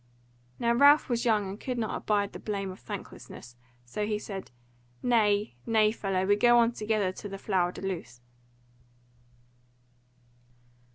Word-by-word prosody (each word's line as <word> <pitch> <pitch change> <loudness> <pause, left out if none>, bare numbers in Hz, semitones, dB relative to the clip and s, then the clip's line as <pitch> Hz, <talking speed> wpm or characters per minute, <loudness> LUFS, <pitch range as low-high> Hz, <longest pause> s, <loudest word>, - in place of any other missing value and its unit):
Now 235 0 +1
Ralph 285 +5 +6
was 240 0 0
young 215 -4 +2
and 195 +3 -7
could 255 -2 -4
not 225 -2 -2
abide 205 -1 0
the - - -7
blame 195 -3 -3
of 185 - -11
thanklessness; 120 0 -9 0.3
so 125 +13 -4
he 210 -1 0
said, 195 -2 -7 0.5
"Nay, 210 - +2
nay, 215 -2 +4
fellow, 195 -4 -1
go 240 +3 +5
we - - +6
on 230 0 +4
together 215 -4 -1
to 205 +2 -8
the 195 - -6
Flower 185 -3 0
de - - -10
Luce." 165 -11 -5
210 Hz, 150 wpm, -28 LUFS, 195-230 Hz, 0.5 s, Ralph